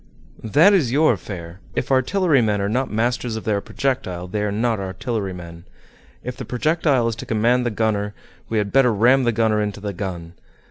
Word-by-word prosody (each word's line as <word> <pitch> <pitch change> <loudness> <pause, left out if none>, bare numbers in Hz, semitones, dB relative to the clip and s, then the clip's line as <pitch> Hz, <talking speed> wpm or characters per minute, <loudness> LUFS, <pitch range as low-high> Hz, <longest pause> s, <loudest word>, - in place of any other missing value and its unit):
"That 150 - +5
is 150 -12 +2
your 155 +4 +4
affair. 85 -2 -8 0.2
If - - -2
artillerymen 130 - +2
are 100 - 0
not 125 +6 -1
masters 120 +1 -1
of 110 - -5
their 105 -2 0
projectile 95 -12 -3
they 105 +3 -3
are 105 -1 -1
not 110 +1 0
artillerymen. 95 -4 -5 0.6
If 125 0 -5
the 130 - -5
projectile 135 0 +1
is 115 - -1
to - - -7
command 120 +3 +2
the - - +1
gunner, 105 -2 -1 0.3
we 110 - -1
had 105 -1 0
better 135 -2 +5
ram 125 +5 +4
the 120 - +3
gunner 110 -1 +1
into 105 -1 -3
the 100 0 -4
gun. 85 -3 -6
110 Hz, 185 wpm, -21 LUFS, 100-125 Hz, 0.6 s, That